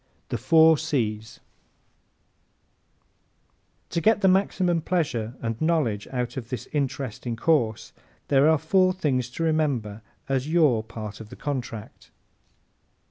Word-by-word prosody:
The - - -2
Four 160 +4 +5
C's 110 -8 -2 2.5
¶ - - -44
To 170 - -1
get 215 +1 +3
the 190 - +4
maximum 185 -2 +2
of - - -12
pleasure 135 -10 -1
and 115 -1 -3
knowledge 155 -11 0
out 125 +1 -4
of 120 -3 -6
this 125 -5 -5
interesting 130 -5 -3
course 115 -5 0 0.3
there 140 +2 +4
are 160 - +4
four 185 +4 +2
things 130 -9 -1
to 145 +6 -4
remember 140 -10 0 0.3
as 135 +1 -1
your 155 -9 +3
part 110 -1 -8
of 110 - -11
the - - -10
contract. 120 -6 -6
135 Hz, 135 wpm, -25 LUFS, 115-160 Hz, 2.5 s, Four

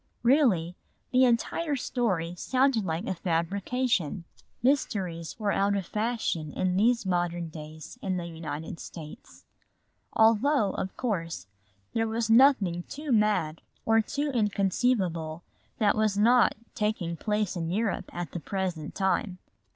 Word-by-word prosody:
Really, 230 - +3 0.4
the 255 0 +5
entire 280 +6 +1
story 190 -11 -1
sounded 255 +1 +1
like 165 0 -2
a - - -1
fabrication. 185 - -1 0.4
Mysteries 185 - 0
were 210 -2 +1
out 200 +1 +2
of 195 -2 -2
fashion 215 -9 -2
in 185 -1 0
these 230 +2 +3
modern 175 -2 -1
days 155 +7 -10
in 185 -2 -1
the 175 - -4
United 160 -1 -6
States. 155 -3 -11 0.7
Although, 225 +1 +4
of 190 - -5
course, 170 - -2 0.5
there 225 0 +1
was 225 0 -1
nothing 225 -9 +5
too 295 0 -5
mad 210 -8 +2 0.2
or 225 0 +4
too 285 +6 -2
inconceivable 195 -6 0 0.3
that 210 -5 +3
was 215 -2 +1
not 240 +4 +5 0.2
taking 210 -6 -1
place 210 +1 -1
in 165 -2 -2
Europe 200 0 -1
at 175 -1 -5
the 175 - -4
present 180 -3 -3
time. 190 -1 0
200 Hz, 130 wpm, -28 LUFS, 170-230 Hz, 0.7 s, the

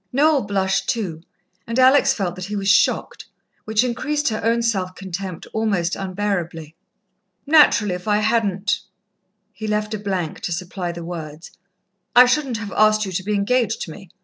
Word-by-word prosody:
Noel 295 +1 +3
blushed 195 -2 -1
too 195 -10 -2 0.5
and 230 +1 -3
Alex 270 +1 +5
felt 195 -9 -2
that 185 0 -6
he 205 +2 -5
was 195 -1 -3
shocked, - - +1 0.4
which 220 +2 +2
increased 295 +4 -1
her 215 - -3
own 230 +1 +1
self 190 -5 -1
contempt 190 -2 -6
almost 200 -6 0
unbearably. 180 -5 -3 0.7
"Naturally, 285 - +5
if 180 +3 -7
I 210 -1 +3
hadn't 215 -2 +1 0.4
" - - -53 0.3
he 215 +3 -6
left 210 0 -1
a 215 - -3
blank 190 -6 -3
to - - -4
supply 180 0 -4
the 170 -1 -8
words, 160 -2 -8 0.6
"I 250 +1 +9
shouldn't 255 -1 0
have 205 -2 -6
asked 215 0 +3
you 190 - -5
to 185 +1 -3
be 210 +2 -1
engaged 230 +3 0
to - - -5
me. 190 +3 -12
205 Hz, 175 wpm, -21 LUFS, 185-230 Hz, 0.7 s, I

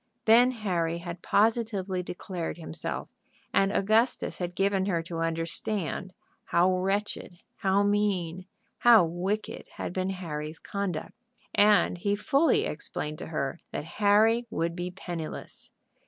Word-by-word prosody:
Then 235 +3 +7
Harry 180 -9 -1
had 170 0 -7
positively 205 -4 +1
declared 175 -1 -5
himself, 160 -1 -5 0.5
and 195 0 +3
Augustus 220 +5 +1
had 175 -1 -3
given 195 0 +1
her 170 -4 0
to 165 0 -5
understand 165 +3 -2 0.3
how 180 +2 +3
wretched, 195 -1 -2
how 195 +1 +2
mean, 190 -4 0 0.3
how 230 -6 +7
wicked 185 +6 -3
had - - -4
been 185 0 -1
Harry's 160 -4 -5
conduct. 195 -5 -4 0.4
And 205 -3 +4
he 200 +3 +1
fully 310 - +3
explained 150 - -4
to - - -6
her 150 0 -3
that 145 - -4 0.2
Harry 220 +4 +4
would 170 -3 -1
be 175 0 -3
penniless. 175 -3 -7
185 Hz, 125 wpm, -28 LUFS, 170-205 Hz, 0.5 s, Then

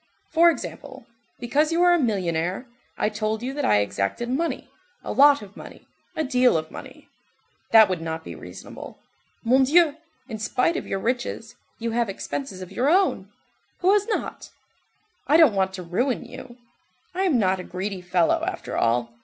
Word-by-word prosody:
For 335 +1 +6
example, 270 -3 -6 0.3
because 290 +6 +1
you 340 +2 +2
are 355 0 +6
a 345 - +3
millionnaire, 185 - -1 0.3
I - - +1
told 215 +1 -2
you 260 +2 -3
that 290 - -3
I 105 0 +4
exacted 100 - -2
money, 320 +7 -2 0.4
a - - -5
lot 285 -2 +5
of 200 0 -14
money, - - -12 0.3
a 315 - -1
deal 250 - +3
of 155 0 -5
money. - - -11 0.6
That 220 -2 +7
would 185 -3 -3
not 160 0 -4
be - - -8
reasonable. - - -10 0.5
Mon 255 +3 +4
Dieu, 310 +2 +4 0.3
in 220 -4 -6
spite 250 +9 0
of - - -4
your - - -2
riches, 235 +1 -3 0.2
you 230 0 -3
have 235 -1 0
expenses 195 0 -5
of 185 - -12
your 250 +8 +1
own—who 380 +1 -1
has 415 -1 +2
not? 450 - -4 0.8
I 295 +3 +5
don't 315 -9 +6
want 190 -1 +1
to 185 -1 -6
ruin 240 +10 -1
you, 240 -1 -11 0.6
I 370 - -2
am 320 -9 +3
not 190 -3 +1
a - - -5
greedy 185 +1 -5
fellow, 180 - +1
after 380 - -5
all. 120 0 0
235 Hz, 175 wpm, -24 LUFS, 190-290 Hz, 0.8 s, That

